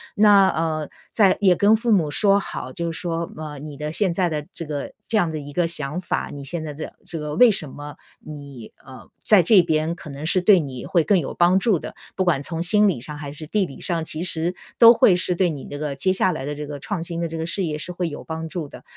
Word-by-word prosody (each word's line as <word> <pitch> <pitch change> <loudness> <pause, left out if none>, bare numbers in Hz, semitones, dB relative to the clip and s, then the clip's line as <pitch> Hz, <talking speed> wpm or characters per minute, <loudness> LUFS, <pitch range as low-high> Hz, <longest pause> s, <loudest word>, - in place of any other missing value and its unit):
那， 205 -3 +6
呃， 155 -2 -2 0.2
再 200 -4 +4
也 190 -4 +4
跟 205 +4 +4
父 230 +1 -1
母 160 -7 +1
说 200 +4 +3
好， - - -6
就 170 -2 -3
说， 165 0 -4
呃， 150 -2 -7
你 150 -1 -9
的 150 +1 -4
现 190 -1 +1
在 180 +1 +1
的 150 -2 -4
这 165 - -7
个 145 -2 -5 0.2
这 220 - +1
样 175 -5 +2
的 155 -1 -4
一 145 0 -10
个 175 +2 +1
想 155 0 +1
法， 175 - -3
你 140 -1 -8
现 160 +4 -3
在 150 -2 -6
的 155 +2 -8
这 165 - -4
个， 150 0 -5
为 245 +3 +7
什 155 -8 -4
么 145 +1 -9 0.2
你 140 -6 -11
呃， 130 -1 -13
在 210 -4 +5
这 185 +2 +6
边 160 0 -1
可 160 -3 -11
能 140 +2 -7
是 180 +3 +1
对 190 0 +6
你 130 -5 -6
会 170 -3 +1
更 200 - +3
有 140 - -5
帮 175 +2 +3
助 195 -4 +2
的， - - -9 0.2
不 185 - +1
管 150 -6 +1
从 165 +2 -4
心 210 +4 +4
理 160 -11 -2
上 150 +4 -6
还 145 -1 -7
是 150 +1 -8
地 205 +2 0
理 140 - -11
上， 170 -3 -1
其 160 +1 -2
实 170 0 0 0.2
都 230 0 +9
会 195 -5 +4
是 180 0 +2
对 180 -1 +2
你 145 -4 -6
这 145 - -7
个 150 -2 -3
接 185 +7 +1
下 185 -1 +2
来 135 - -5
的 145 - -4
这 150 0 -7
个 145 -1 -7
创 205 -5 -4
新 170 0 -5
的 170 - -2
这 165 - -6
个 160 - -3
事 190 +3 0
业 155 -3 -2
是 180 +4 -3
会 175 -1 -2
有 145 - -9
帮 160 0 -5
助 170 -5 -5
的。 - - -13
165 Hz, 285 characters per minute, -22 LUFS, 150-185 Hz, 0.2 s, 都